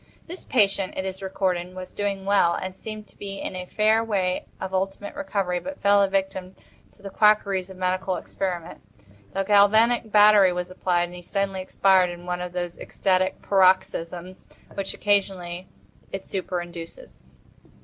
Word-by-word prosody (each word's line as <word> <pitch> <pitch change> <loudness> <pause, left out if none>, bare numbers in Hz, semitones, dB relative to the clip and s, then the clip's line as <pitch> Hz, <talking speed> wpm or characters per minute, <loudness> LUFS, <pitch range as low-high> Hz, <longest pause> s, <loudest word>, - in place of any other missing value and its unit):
This 355 +2 -9
patient, 200 -5 +1
it 190 - -2
is 190 0 -5
recorded, 185 -2 -2
was 185 0 -8
doing 200 -1 -2
well 195 -4 +3
and 185 0 -5
seemed 215 +1 -8
to - - -24
be 195 -1 -6
in - - -5
a 180 0 -6
fair 220 +3 +2
way 190 -5 -1
of 190 0 -5
ultimate 195 +2 -2
recovery, 200 -11 -2
but 285 +8 -7
fell 200 0 +4
a 200 - +4
victim 190 -1 -2 0.4
to 200 - -23
the 195 - -7
quackeries 200 -3 +3
of 190 - -11
medical 185 0 -1
experiment. 180 -4 -4 0.5
The 195 - 0
galvanic 220 +3 +4
battery 205 -3 +6
was 180 0 -4
applied, 180 -1 0
and 175 0 -6
he 180 - -9
suddenly 195 +1 -2
expired 185 -1 +3
in 175 0 -9
one 180 0 -3
of 180 0 -5
those 175 -1 -4
ecstatic 185 -1 0
paroxysms 185 -2 +1 0.3
which, 195 -1 -3
occasionally, 185 -3 0 0.4
it 195 0 -5
superinduces. 175 - -6
190 Hz, 160 wpm, -24 LUFS, 180-200 Hz, 0.5 s, battery